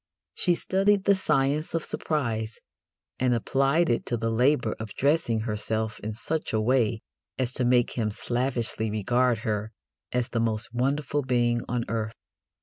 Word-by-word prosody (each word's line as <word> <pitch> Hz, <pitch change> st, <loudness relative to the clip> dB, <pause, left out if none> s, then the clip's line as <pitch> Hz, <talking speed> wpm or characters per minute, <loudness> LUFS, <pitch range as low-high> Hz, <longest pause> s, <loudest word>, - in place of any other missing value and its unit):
She 175 Hz, -2 st, +3 dB
studied 195 Hz, +3 st, +2 dB
the 200 Hz, -, +5 dB
science 150 Hz, -4 st, +1 dB
of 165 Hz, -, -1 dB
surprise, 115 Hz, -8 st, -2 dB, 0.6 s
and 125 Hz, -1 st, +2 dB
applied 135 Hz, +8 st, +2 dB
it 120 Hz, -, +1 dB
to 120 Hz, -, 0 dB
the 115 Hz, 0 st, -1 dB
labour 125 Hz, 0 st, +2 dB
of 110 Hz, -1 st, -7 dB
dressing 140 Hz, -6 st, +2 dB
herself 110 Hz, 0 st, -2 dB
in 110 Hz, 0 st, -4 dB
such 160 Hz, +5 st, -1 dB
a 110 Hz, -, +2 dB
way 115 Hz, -1 st, +2 dB, 0.4 s
as 130 Hz, -1 st, -1 dB
to 125 Hz, -, 0 dB
make 120 Hz, -1 st, +3 dB
him 110 Hz, -3 st, -1 dB
slavishly 120 Hz, 0 st, -1 dB
regard 120 Hz, +3 st, +1 dB
her 105 Hz, 0 st, -1 dB, 0.4 s
as 125 Hz, -1 st, 0 dB
the 115 Hz, -, -1 dB
most 115 Hz, 0 st, -1 dB
wonderful 140 Hz, +3 st, 0 dB
being 120 Hz, -2 st, +1 dB
on 120 Hz, -1 st, -1 dB
earth. 110 Hz, -1 st, -3 dB
120 Hz, 155 wpm, -27 LUFS, 110-135 Hz, 0.6 s, the